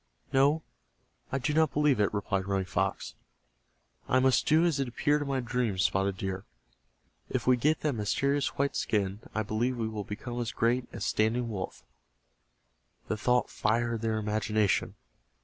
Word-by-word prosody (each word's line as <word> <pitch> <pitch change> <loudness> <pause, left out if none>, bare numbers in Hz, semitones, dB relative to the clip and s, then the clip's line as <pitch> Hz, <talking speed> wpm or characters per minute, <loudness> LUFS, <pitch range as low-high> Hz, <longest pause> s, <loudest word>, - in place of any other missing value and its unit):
"No, 145 +4 +4 0.7
I 135 - 0
do 150 +3 -1
not 160 -1 +3
believe 150 -5 +3
it," 105 - +2
replied 100 -2 -1
Running 95 -1 0
Fox. - - -2 1.0
"I 130 - +4
must 130 0 +3
do 160 +3 +5
as 160 -5 +1
it 135 - 0
appeared 145 +5 +1
in 145 - -3
my 135 -1 0
dream. 120 -4 -1
Spotted 95 +1 +1
Deer, 95 0 -3 0.9
if - - -2
we 125 - +5
get 150 +6 +1
that 150 -2 0
mysterious 140 +5 0
white 140 0 0
skin, 100 -1 0 0.2
I 110 - +1
believe 120 +4 -1
we 115 -1 -1
will 110 -2 -4
become 120 +5 -5
as 115 - -2
great 120 +2 +1
as - - -4
Standing 115 +2 +1
Wolf." 95 -4 -5 1.3
The - - +1
thought 125 +3 +1
fired 115 +1 0
their 110 -1 0
imagination. 105 -1 0
120 Hz, 165 wpm, -29 LUFS, 105-135 Hz, 1.3 s, do